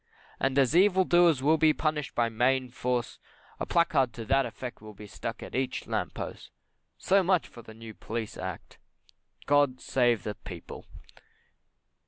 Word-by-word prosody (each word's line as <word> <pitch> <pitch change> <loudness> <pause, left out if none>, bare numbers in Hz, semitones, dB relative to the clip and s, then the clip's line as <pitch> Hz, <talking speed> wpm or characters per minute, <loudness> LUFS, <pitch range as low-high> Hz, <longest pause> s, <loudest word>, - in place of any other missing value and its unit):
And 135 0 0
as 135 +2 +3
evil 190 0 +5
doers 175 -7 +4
will 155 +2 +3
be 155 0 +5
punished 150 -2 -2
by 120 -1 +2
Mayne 125 +3 +1
force, 125 -1 -2 0.4
a - - -3
placard 140 -7 +2
to 115 - -7
that 135 +2 +2
effect 120 0 -8
will 110 -1 -11
be 105 - -11
stuck 115 +2 -6
on - - -10
each 130 0 -2
lamp - - -3
post. - - -7 0.5
So 195 +1 +3
much 185 -1 +1
for 120 - -13
the 110 -1 -13
New 115 0 -10
Police 110 0 -5
Act. 95 -2 -7 0.7
God 145 -3 +3
save 120 -4 +1
the 105 - -3
People! 90 -4 -10
130 Hz, 165 wpm, -28 LUFS, 115-155 Hz, 0.7 s, evil